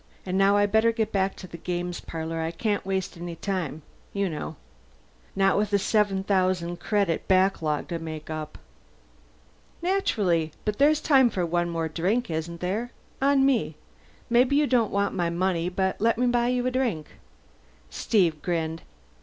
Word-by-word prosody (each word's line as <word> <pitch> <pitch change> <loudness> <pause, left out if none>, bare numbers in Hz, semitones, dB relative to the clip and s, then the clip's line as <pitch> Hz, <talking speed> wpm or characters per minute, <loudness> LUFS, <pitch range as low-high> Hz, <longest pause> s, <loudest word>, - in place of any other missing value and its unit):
And 185 0 -2
now 195 +1 +4
I'd 205 0 +2
better 220 +1 +4
get 220 -1 -1
back 195 -1 0
to 185 - -10
the 170 - -10
games 175 0 -3
parlor 165 0 -5
I 160 - -1
can't 205 +5 -1
waste 190 -2 -3
any 170 0 -6
time, 165 -5 -3 0.3
you 200 -1 0
know. 155 -2 -5 0.8
Not 195 0 +3
with 210 0 -1
a - - +6
seven 200 -1 +1
thousand 185 -3 0
credit 200 -6 0
backlog 185 -6 +2
to 170 -1 -3
make 155 -1 -7
up." 155 -1 -6 1.2
"Naturally. 200 - +1
But 210 -1 -2
there's 300 +2 +4
time 265 -5 +5
for 185 -5 -1
one 175 +1 0
more 165 -1 -2
drink, 190 +8 -1
isn't 165 +1 -4
there? 205 +7 -2 0.3
On 275 0 +4
me. 225 - +1 0.5
Maybe 250 +3 +3
you 295 +1 +4
don't 245 -5 +2
want 200 0 0
my 175 -3 0
money, 175 0 0
but 190 +1 -1
let 225 0 +3
me 250 - +2
buy 240 -1 +2
you 250 0 0
a 255 - +1
drink." 235 - -1 0.8
Steve 170 -9 +1
grinned. 165 -2 -2
190 Hz, 170 wpm, -26 LUFS, 170-220 Hz, 1.2 s, a